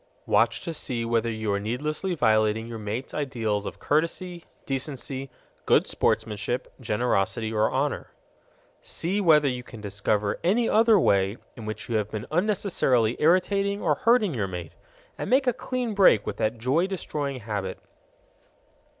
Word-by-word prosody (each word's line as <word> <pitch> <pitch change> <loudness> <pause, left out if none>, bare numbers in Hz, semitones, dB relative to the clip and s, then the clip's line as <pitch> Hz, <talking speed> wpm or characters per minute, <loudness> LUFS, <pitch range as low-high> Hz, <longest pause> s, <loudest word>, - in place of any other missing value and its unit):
Watch - - +2
to 165 - -4
see 125 -6 -3
whether 115 0 +1
you 110 -2 -2
are 100 - 0
needlessly 150 - -2
violating 110 -4 +2
your 115 -1 -7
mate's 110 +5 -4
ideals 115 -8 -2
of - - -7
courtesy, 170 +3 -1 0.2
decency, 135 -1 -4 0.4
good - - +5
sportmanship, 110 +3 -1
generosity, 110 -1 0
or 110 0 +2
honor. 140 +2 -1 0.7
See 190 +5 -2
whether 155 -5 +5
you 125 -2 -1
can 115 -2 -12
discover 100 0 -1
any 220 +7 +2
other 225 -1 +5
way 100 - +2 0.2
in 110 -2 -8
which 110 0 -5
you 115 - 0
have 105 -1 -2
been 110 +1 -5
unnecessarily 165 - +2
irritating 195 +5 +2
or - - +2
hurting 230 -6 +3
your 105 -6 -1
mate, 90 -4 -7 0.5
and - - -3
make 265 +2 +4
a 250 - +3
clean 250 -1 -3
break 190 - +5
with - - -4
that 110 +1 0
joy 135 +10 +1
destroying 145 -8 -4
habit. 100 -3 -4
125 Hz, 150 wpm, -26 LUFS, 110-170 Hz, 0.7 s, good